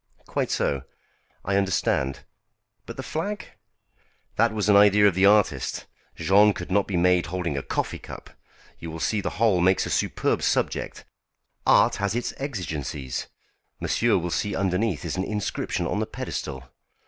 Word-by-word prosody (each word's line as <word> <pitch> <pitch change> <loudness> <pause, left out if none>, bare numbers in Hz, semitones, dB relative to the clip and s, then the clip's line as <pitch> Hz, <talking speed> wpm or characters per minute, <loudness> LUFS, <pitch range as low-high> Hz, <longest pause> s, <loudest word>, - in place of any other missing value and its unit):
"Quite - - -2
so. 70 -2 0 0.6
I 100 +1 +1
understand. 70 -8 0 0.7
But 115 - -8
the 130 - -5
flag?" 185 +10 -4 0.9
"That 115 +1 +3
was 105 -2 -1
an 105 - +5
idea 105 0 +6
of 100 - +3
the 95 +3 +4
artist. 105 0 +2 0.3
Jean 105 +2 +4
could 90 0 -7
not 100 +1 +2
be 95 - -1
made 90 -2 +3
holding 85 -2 -3
a 70 - -1
coffee - - -3
cup. - - -10 0.5
You 85 - -7
will 80 0 -7
see 105 +5 0
the 85 - -2
whole 105 -5 +3
makes 95 +1 +3
a - - -4
superb - - 0
subject. - - -1 0.6
Art - - +5
has 100 +1 -1
its 120 - -2
exigencies. 80 - -4 0.5
Monsieur 115 -3 +2
will 85 -1 -3
see 100 +3 -1
underneath 95 -2 0
is 85 - -3
an 95 - 0
inscription 105 0 -2
on - - -1
the - - -1
pedestal." 65 -1 -5
95 Hz, 160 wpm, -25 LUFS, 85-105 Hz, 0.9 s, idea